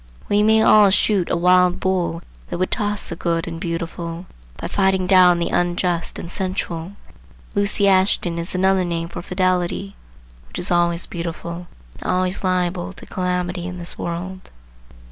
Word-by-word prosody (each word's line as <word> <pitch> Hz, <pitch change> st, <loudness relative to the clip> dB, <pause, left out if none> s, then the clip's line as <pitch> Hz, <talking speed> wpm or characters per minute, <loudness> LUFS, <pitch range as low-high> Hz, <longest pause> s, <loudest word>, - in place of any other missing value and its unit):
We 205 Hz, 0 st, +3 dB
may 220 Hz, +1 st, +4 dB
all 210 Hz, -2 st, +7 dB
shoot 195 Hz, -1 st, +2 dB
a -, -, +1 dB
wild 180 Hz, +1 st, +4 dB
bull 180 Hz, -3 st, -1 dB, 0.2 s
that -, -, -4 dB
would 185 Hz, +1 st, -1 dB
toss 210 Hz, -2 st, -1 dB
the 170 Hz, -, -4 dB
good 165 Hz, -1 st, -1 dB
and 165 Hz, -1 st, -6 dB
beautiful, 170 Hz, 0 st, -4 dB, 0.3 s
by -, -, -5 dB
fighting 190 Hz, -1 st, +1 dB
down 180 Hz, -2 st, +6 dB
the 170 Hz, -, -1 dB
unjust 175 Hz, -1 st, -1 dB
and 170 Hz, -, -7 dB
sensual. 185 Hz, -2 st, -3 dB, 0.6 s
Lucy 200 Hz, 0 st, +3 dB
Ashton 185 Hz, -3 st, +2 dB
is 170 Hz, +2 st, -3 dB
another 190 Hz, 0 st, +3 dB
name 170 Hz, -1 st, -3 dB
for 175 Hz, -, -7 dB
fidelity, 185 Hz, +2 st, -1 dB, 0.5 s
which -, -, -8 dB
is -, -, -4 dB
always 175 Hz, 0 st, +2 dB
beautiful 170 Hz, 0 st, -6 dB, 0.3 s
and -, -, -2 dB
always 185 Hz, +1 st, -1 dB
liable 180 Hz, 0 st, -1 dB
to -, -, -12 dB
calamity 180 Hz, -1 st, -2 dB
in 180 Hz, 0 st, -6 dB
this 175 Hz, 0 st, -1 dB
world. 185 Hz, +2 st, -6 dB
180 Hz, 160 wpm, -21 LUFS, 170-190 Hz, 0.6 s, all